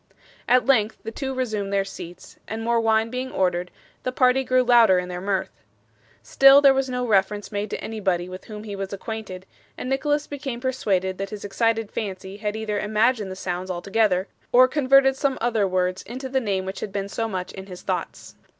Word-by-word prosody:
At 250 Hz, -1 st, +4 dB
length 225 Hz, -5 st, +2 dB
the 225 Hz, -, -5 dB
two 265 Hz, +3 st, -4 dB
resumed 220 Hz, -6 st, -2 dB
their 195 Hz, -1 st, +1 dB
seats, 175 Hz, -2 st, -10 dB
and 225 Hz, +1 st, -4 dB
more 235 Hz, 0 st, +2 dB
wine 225 Hz, 0 st, +2 dB
being 255 Hz, +1 st, -4 dB
ordered, 180 Hz, -1 st, 0 dB, 0.3 s
the 255 Hz, -, -2 dB
party 255 Hz, +1 st, +3 dB
grew 255 Hz, 0 st, +3 dB
louder 235 Hz, -6 st, +6 dB
in 180 Hz, 0 st, -2 dB
their 180 Hz, 0 st, -5 dB
mirth. 195 Hz, 0 st, -1 dB, 0.7 s
Still 275 Hz, +1 st, +7 dB
there 280 Hz, -1 st, +6 dB
was 270 Hz, 0 st, 0 dB
no 250 Hz, 0 st, -2 dB
reference 205 Hz, -1 st, +1 dB
made 205 Hz, 0 st, -3 dB
to -, -, -5 dB
anybody 190 Hz, -5 st, -1 dB
with 185 Hz, 0 st, -9 dB
whom 210 Hz, -1 st, -8 dB
he 205 Hz, -2 st, -6 dB
was 195 Hz, -1 st, -5 dB
acquainted, 200 Hz, -3 st, -6 dB, 0.3 s
and -, -, -5 dB
Nicholas 290 Hz, +2 st, 0 dB
became 275 Hz, -4 st, -5 dB
persuaded 195 Hz, -8 st, -1 dB
that 195 Hz, 0 st, -3 dB
his 205 Hz, 0 st, -7 dB
excited 225 Hz, +1 st, 0 dB
fancy 190 Hz, -2 st, -5 dB
had 210 Hz, 0 st, -3 dB
either 215 Hz, -2 st, -2 dB
imagined 215 Hz, 0 st, +1 dB
the 185 Hz, -, -6 dB
sounds 185 Hz, 0 st, -4 dB
altogether, 190 Hz, +1 st, +1 dB, 0.2 s
or 255 Hz, +1 st, +7 dB
converted 270 Hz, -1 st, +4 dB
some 270 Hz, -1 st, 0 dB
other 225 Hz, -4 st, +1 dB
words 185 Hz, 0 st, 0 dB
into 255 Hz, +5 st, -7 dB
the 265 Hz, 0 st, 0 dB
name 195 Hz, -4 st, -1 dB
which 190 Hz, -, -5 dB
had 200 Hz, -, -5 dB
been 200 Hz, 0 st, -3 dB
so 225 Hz, +3 st, -2 dB
much 185 Hz, -4 st, -4 dB
in 190 Hz, 0 st, -9 dB
his 180 Hz, -2 st, -10 dB
thoughts. -, -, -4 dB
215 Hz, 200 wpm, -24 LUFS, 190-250 Hz, 0.7 s, Still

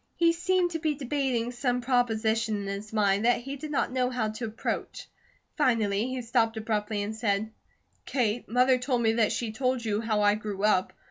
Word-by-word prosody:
He 335 Hz, -1 st, +4 dB
seemed 360 Hz, +1 st, +1 dB
to 325 Hz, -, -3 dB
be 310 Hz, -2 st, 0 dB
debating 265 Hz, -4 st, -1 dB
some 245 Hz, 0 st, -1 dB
proposition 225 Hz, -3 st, +1 dB
in -, -, -6 dB
his 200 Hz, +2 st, -5 dB
mind, 205 Hz, -2 st, +2 dB
that 240 Hz, +1 st, +3 dB
he 275 Hz, +3 st, -6 dB
did 300 Hz, +2 st, -7 dB
not 285 Hz, -4 st, 0 dB
know 255 Hz, -1 st, +1 dB
how 245 Hz, -4 st, -1 dB
to 215 Hz, +2 st, -5 dB
approach. 220 Hz, 0 st, -4 dB, 0.5 s
Finally 225 Hz, -6 st, +2 dB
he 255 Hz, -1 st, -4 dB
stopped 225 Hz, -1 st, +1 dB
abruptly 215 Hz, -1 st, -1 dB
and 215 Hz, +2 st, -4 dB
said: 215 Hz, -1 st, -1 dB, 0.5 s
"Kate, 240 Hz, -3 st, -1 dB
Mother 250 Hz, +2 st, +4 dB
told 250 Hz, -2 st, 0 dB
me 225 Hz, 0 st, +3 dB
that 225 Hz, -2 st, +2 dB
she 230 Hz, -3 st, -2 dB
told 255 Hz, +1 st, -1 dB
you 210 Hz, 0 st, 0 dB
how 215 Hz, -2 st, 0 dB
I 205 Hz, 0 st, +5 dB
grew 210 Hz, -2 st, -4 dB
up. 200 Hz, -3 st, +2 dB
230 Hz, 195 wpm, -28 LUFS, 215-255 Hz, 0.5 s, I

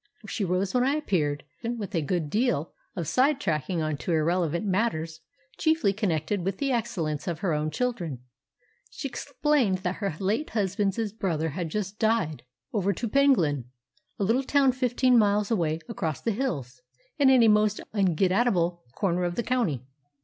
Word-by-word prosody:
She 215 Hz, -, -2 dB
rose 185 Hz, +1 st, 0 dB
when 250 Hz, -1 st, +3 dB
I 275 Hz, +3 st, +2 dB
appeared, 155 Hz, -, 0 dB, 0.2 s
and, 235 Hz, +1 st, -2 dB
with 205 Hz, -2 st, -6 dB
a 165 Hz, -, +1 dB
good 155 Hz, -1 st, -2 dB
deal 220 Hz, -, 0 dB, 0.2 s
of 170 Hz, -4 st, -3 dB
side 270 Hz, -, +3 dB
tracking 160 Hz, -, -1 dB
on 155 Hz, -1 st, -1 dB
to 175 Hz, -, -4 dB
irrelevant 170 Hz, +2 st, +1 dB
matters, 185 Hz, -6 st, -1 dB, 0.4 s
chiefly 315 Hz, -11 st, +2 dB
connected 190 Hz, -2 st, -1 dB
with 195 Hz, +1 st, -2 dB
the 275 Hz, -1 st, 0 dB
excellence 180 Hz, -, -2 dB
of 170 Hz, -1 st, -3 dB
her 185 Hz, -5 st, +1 dB
own 150 Hz, +1 st, 0 dB
children, 175 Hz, -, -2 dB, 0.7 s
she 280 Hz, -, -5 dB
explained 250 Hz, -7 st, 0 dB
that 180 Hz, +1 st, -1 dB
her 195 Hz, -6 st, -2 dB
late 215 Hz, +10 st, 0 dB
husband's 205 Hz, 0 st, 0 dB
brother 165 Hz, -7 st, -1 dB
had 165 Hz, +3 st, -4 dB
just 205 Hz, +3 st, -4 dB
died 220 Hz, -9 st, +1 dB, 0.3 s
"over 200 Hz, -1 st, +1 dB
to 230 Hz, -, -3 dB
Penglyn," 205 Hz, -, +3 dB, 0.5 s
a -, -, -1 dB
little 230 Hz, +7 st, +2 dB
town 275 Hz, 0 st, +3 dB
fifteen 250 Hz, -1 st, +3 dB
miles 210 Hz, 0 st, +2 dB
away 165 Hz, -7 st, +1 dB
across 155 Hz, -4 st, -3 dB
the 230 Hz, -, -1 dB
hills, 185 Hz, -, -3 dB, 0.4 s
and 275 Hz, -2 st, +6 dB
in 255 Hz, -3 st, +6 dB
a -, -, +6 dB
most 210 Hz, 0 st, +3 dB
un 190 Hz, -5 st, +2 dB
get 185 Hz, +3 st, +2 dB
at 240 Hz, +6 st, +3 dB
able 175 Hz, -4 st, 0 dB
corner 180 Hz, -2 st, 0 dB
of 175 Hz, 0 st, -1 dB
the 235 Hz, -, -1 dB
county. 205 Hz, -, 0 dB
195 Hz, 180 wpm, -27 LUFS, 165-235 Hz, 0.7 s, and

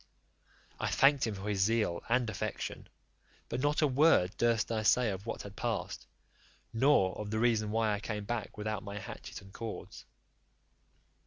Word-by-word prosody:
I -, -, -1 dB
thanked 135 Hz, -3 st, +4 dB
him 110 Hz, -, -3 dB
for 95 Hz, +2 st, -6 dB
his 100 Hz, -2 st, 0 dB
zeal 105 Hz, -4 st, +1 dB
and 120 Hz, 0 st, +2 dB
affection, 110 Hz, -1 st, -4 dB, 0.6 s
but -, -, -2 dB
not 145 Hz, +3 st, +2 dB
a -, -, +5 dB
word 135 Hz, -, +4 dB
durst 115 Hz, -1 st, +2 dB
I 110 Hz, -1 st, 0 dB
say 115 Hz, +1 st, +4 dB
of 95 Hz, +3 st, -6 dB
what -, -, -4 dB
had 100 Hz, 0 st, -10 dB
passed, -, -, -3 dB, 0.7 s
nor 115 Hz, -6 st, +4 dB
of 105 Hz, -1 st, -4 dB
the 110 Hz, -, -1 dB
reason 110 Hz, -2 st, +2 dB
why 110 Hz, 0 st, +1 dB
I 105 Hz, -, -2 dB
came 105 Hz, -1 st, -4 dB
back 115 Hz, 0 st, -4 dB
without 105 Hz, -1 st, -3 dB
my 100 Hz, 0 st, -7 dB
hatchet 100 Hz, -, -8 dB
and 95 Hz, 0 st, -15 dB
cords. 115 Hz, -2 st, -7 dB
110 Hz, 170 wpm, -32 LUFS, 105-120 Hz, 0.7 s, a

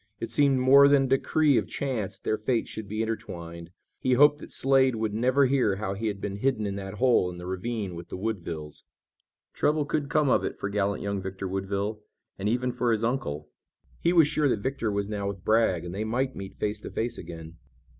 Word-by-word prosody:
It 115 Hz, -, -4 dB
seemed 140 Hz, +2 st, +3 dB
more 135 Hz, +2 st, +7 dB
than 140 Hz, -1 st, +5 dB
a -, -, -1 dB
decree 140 Hz, +1 st, +3 dB
of -, -, -5 dB
chance 125 Hz, -9 st, -3 dB
that -, -, -34 dB
their 110 Hz, -, 0 dB
fates 115 Hz, +2 st, -1 dB
should 110 Hz, -2 st, -6 dB
be 110 Hz, +3 st, -2 dB
intertwined. 85 Hz, -6 st, -6 dB, 0.3 s
He 130 Hz, -, +1 dB
hoped 145 Hz, +3 st, +5 dB
that -, -, -11 dB
Slade 135 Hz, -2 st, +3 dB
would 110 Hz, -1 st, -2 dB
never 130 Hz, +5 st, +3 dB
hear 125 Hz, -7 st, +2 dB
how 100 Hz, -1 st, -3 dB
he 110 Hz, +3 st, -3 dB
had 100 Hz, -2 st, -3 dB
been 100 Hz, 0 st, -4 dB
hidden 115 Hz, -2 st, 0 dB
in 100 Hz, -1 st, -3 dB
that 95 Hz, 0 st, -6 dB
hole 120 Hz, -6 st, +3 dB
in 90 Hz, -, -8 dB
the 90 Hz, -, -8 dB
ravine 95 Hz, +1 st, -3 dB
with 85 Hz, 0 st, -9 dB
the -, -, -5 dB
Woodvilles. 85 Hz, -8 st, -5 dB, 0.7 s
Trouble 150 Hz, 0 st, +1 dB
could 145 Hz, -1 st, -2 dB
come 150 Hz, -1 st, +2 dB
of -, -, +3 dB
it -, -, -3 dB
for 100 Hz, -, -3 dB
gallant 100 Hz, 0 st, -1 dB
young 100 Hz, -1 st, -2 dB
Victor 95 Hz, 0 st, -5 dB
Woodville, 100 Hz, +3 st, -3 dB, 0.4 s
and 100 Hz, +2 st, 0 dB
even 125 Hz, +2 st, 0 dB
for 120 Hz, -1 st, 0 dB
his 110 Hz, 0 st, 0 dB
uncle. 115 Hz, -, -2 dB, 0.5 s
He 170 Hz, -, +2 dB
was 165 Hz, -4 st, +6 dB
sure 150 Hz, -1 st, +1 dB
that 110 Hz, -, 0 dB
Victor 130 Hz, -5 st, -1 dB
was 100 Hz, 0 st, -1 dB
now 100 Hz, -1 st, -3 dB
with 100 Hz, -1 st, -6 dB
Bragg 110 Hz, -6 st, +2 dB
and 90 Hz, -, -6 dB
they 100 Hz, +3 st, -2 dB
might 130 Hz, +4 st, -1 dB
meet 95 Hz, 0 st, -8 dB
face 105 Hz, 0 st, -3 dB
to -, -, -7 dB
face 115 Hz, +1 st, -3 dB
again. 80 Hz, -1 st, -9 dB
110 Hz, 225 wpm, -27 LUFS, 95-130 Hz, 0.7 s, more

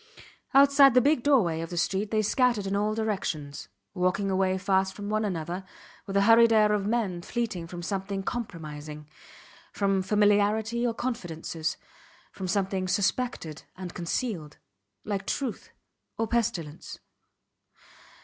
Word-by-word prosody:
Outside 275 Hz, -1 st, +7 dB
the -, -, +8 dB
big 285 Hz, +1 st, +3 dB
doorway 215 Hz, -, +3 dB
of 165 Hz, -, -5 dB
the 175 Hz, -, -6 dB
street 195 Hz, +4 st, 0 dB
they 215 Hz, 0 st, +1 dB
scattered 235 Hz, -1 st, +2 dB
in 195 Hz, +1 st, -1 dB
all 210 Hz, +1 st, 0 dB
directions, 185 Hz, -10 st, -3 dB, 0.3 s
walking 185 Hz, +2 st, 0 dB
away 190 Hz, 0 st, +1 dB
fast 190 Hz, 0 st, +1 dB
from 205 Hz, 0 st, -6 dB
one 215 Hz, +1 st, 0 dB
another 180 Hz, -1 st, -3 dB, 0.4 s
with 195 Hz, -, -5 dB
the 200 Hz, -, +4 dB
hurried 230 Hz, +2 st, +6 dB
air 215 Hz, -1 st, +5 dB
of 205 Hz, -1 st, 0 dB
men 210 Hz, -6 st, -1 dB
fleeing 200 Hz, -5 st, -3 dB
from 175 Hz, 0 st, -7 dB
something 195 Hz, +1 st, -3 dB
compromising; 155 Hz, -10 st, -6 dB, 0.6 s
from 195 Hz, -1 st, +1 dB
familiarity 210 Hz, +4 st, +2 dB
or 230 Hz, -, -2 dB
confidences; 165 Hz, -10 st, -3 dB, 0.5 s
from 190 Hz, -, -6 dB
something 190 Hz, -1 st, -1 dB
suspected 195 Hz, -, -1 dB, 0.2 s
and 180 Hz, -2 st, -7 dB
concealed 170 Hz, -, -3 dB, 0.5 s
like 200 Hz, -2 st, -3 dB
truth 265 Hz, -6 st, -3 dB, 0.5 s
or 225 Hz, -, 0 dB
pestilence. 175 Hz, -10 st, -2 dB
200 Hz, 135 wpm, -27 LUFS, 180-225 Hz, 0.6 s, the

